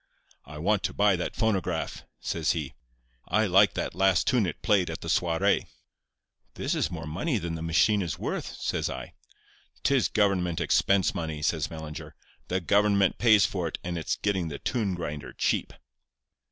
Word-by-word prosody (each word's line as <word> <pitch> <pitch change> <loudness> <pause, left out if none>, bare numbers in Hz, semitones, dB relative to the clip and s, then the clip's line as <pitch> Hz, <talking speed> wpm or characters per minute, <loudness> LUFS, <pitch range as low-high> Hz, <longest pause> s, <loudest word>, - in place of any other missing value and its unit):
"'I 75 +3 -10
want 100 +6 +1
to - - -3
buy 100 -1 +4
that 90 - -4
phonograph,' 110 -4 -1
says 80 -1 0
he. 75 -6 -4 0.5
'I 110 +4 +2
liked 100 +1 +4
that - - -2
last 95 0 +3
tune 120 -7 +2
it 85 - -6
played 100 -6 +3
at 80 - -6
the - - -7
soirée.' 85 0 +1 0.9
"'This - - -2
is - - 0
more 85 -3 -6
money 105 - -1
than 85 -4 -4
the 80 - -5
machine 80 +6 +3
is 85 -4 -3
worth,' - - -4
says - - -1
I. - - -7 0.7
"''Tis 135 -3 +3
government 90 -5 +1
expense 95 +2 +2
money,' 80 -3 -4
says 80 -1 0
Mellinger. 80 -2 -8 0.3
'The 95 +1 -1
government 100 +1 +3
pays 110 -5 +6
for 90 -3 -2
it, - - -4
and 85 0 -3
it's 80 - -1
getting 95 -4 -1
the 75 -3 -5
tune 105 - -1
grinder 75 -4 -6
cheap. - - 0
90 Hz, 170 wpm, -27 LUFS, 80-100 Hz, 0.9 s, pays